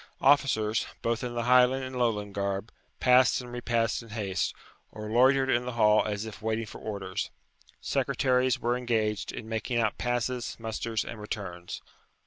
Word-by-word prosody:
Officers, 130 -6 +3 0.2
both 115 +1 0
in 120 -1 -4
the 120 - -1
Highland 125 +2 +5
and 130 0 -6
Lowland 105 -5 0
garb, 100 +2 -2 0.3
passed 125 0 +5
and 125 -1 -8
repassed 120 -1 0
in 115 - -13
haste, 105 -4 -1 0.4
or 105 0 -7
loitered 130 +3 +5
in 125 -2 +2
the 125 - -4
hall 105 -2 +4
as 105 0 -3
if 110 0 -9
waiting 110 +1 -1
for - - -11
orders. 100 -4 -4 0.5
Secretaries 130 -1 +1
were 120 +1 +1
engaged 110 -4 -1
in 110 - -7
making 115 +2 -2
out 110 -3 +1
passes, 120 0 -1
musters, 110 -1 -2
and 115 -2 -7
returns. 90 -4 -6
115 Hz, 160 wpm, -28 LUFS, 105-125 Hz, 0.5 s, Highland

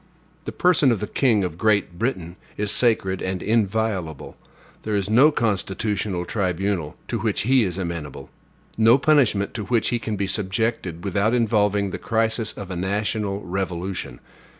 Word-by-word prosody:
The - - -4
person 170 -7 +3
of 115 - 0
the 105 - -2
king 110 -4 +2
of 90 -2 -4
Great 105 -5 +1
Britain 95 -8 -2 0.2
is 105 0 -1
sacred 95 -6 +1
and 95 -1 -3
inviolable; 105 -7 -1 0.5
there 110 -1 -2
is 100 0 -1
no 130 +7 +7
constitutional 100 - -1
tribunal 95 -4 -2
to 115 - -2
which 110 -1 0
he 130 +2 +3
is 90 -3 -2
amenable; 85 -6 -5 0.5
no 115 +3 +6
punishment 135 -9 +2
to 105 -3 -4
which 115 -1 +1
he 120 - 0
can 110 -2 -3
be 100 0 -1
subjected 95 -3 -2
without 100 +4 +1
involving 105 -4 +1
the - - -5
crisis 110 0 0
of 100 -2 -8
a - - -3
national 100 +2 -2
revolution. 90 -6 -4
100 Hz, 155 wpm, -23 LUFS, 95-115 Hz, 0.5 s, no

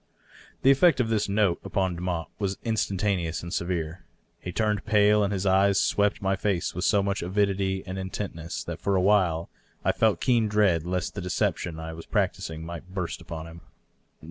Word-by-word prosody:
The 135 - +7
effect 140 +1 +5
of 115 -3 +1
this 105 -2 0
note 100 -3 +2
upon 95 -3 -1
Demotte 85 -1 -3
was 100 -2 -1
instantaneous 100 -7 -1
and 85 +1 -6
severe. 85 -1 -2 0.4
He 90 - -6
turned 105 +1 0
pale, 105 -1 +4
and 100 - 0
his 100 -1 -2
eyes 95 +1 +4
swept 105 0 +1
my 95 0 +2
face 95 -2 -1
with 90 - -2
so 100 -2 +3
much 100 0 -1
avidity 95 0 0
and 95 0 -5
intentness 95 -3 -5
that - - -6
for 100 - +1
a - - +3
while 90 -5 +2 0.3
I - - +4
felt 110 -2 +2
keen 120 -4 +2
dread 100 -6 +2
lest 90 0 -2
the 100 - -5
deception 85 -2 -1
I 80 0 -6
was 80 0 -10
practising 80 0 -1
might 85 +2 -8
burst 90 -4 -3
upon 80 -1 -7
him. 85 +1 -11
95 Hz, 185 wpm, -26 LUFS, 85-105 Hz, 0.4 s, The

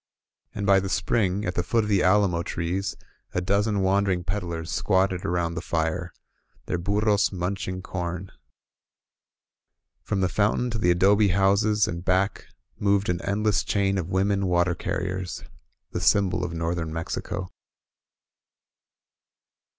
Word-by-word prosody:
And 100 - -2
by 100 -1 +5
the 95 0 -4
spring, 100 0 0
at 90 - -1
the 90 - 0
foot 110 +6 +1
of - - -3
the 100 -3 +2
alamo 95 -2 +3
trees, 90 +3 -2 0.4
a - - +3
dozen 100 +3 +1
wandering 95 -1 +1
peddlers 85 -3 -4
squatted 95 -2 +1
around 85 -1 -1
their 80 - -4
fire, 85 +2 -2 0.5
their 90 - -2
burros 100 +2 +2
munching 95 0 -3
com. 90 0 -4 1.7
From 100 - -2
the 95 - +3
foun 100 +3 +1
tain 125 - -1
to 115 - -2
the 90 - +2
adobe 100 +4 +4
houses 100 +3 +3
and 85 0 -4
back 95 +2 0 0.3
moved 100 -1 +2
an 90 0 0
endless 105 -1 +1
chain 100 -1 +1
of 90 -1 -4
women 100 +1 +1
water 90 0 +2
carriers, 90 +1 -4 0.2
— - - -50
the - - -3
symbol 95 -3 +2
of 90 - -3
north 85 +1 -2
ern 80 -1 -4
Mexico. 80 +3 -4
95 Hz, 145 wpm, -25 LUFS, 90-100 Hz, 1.7 s, by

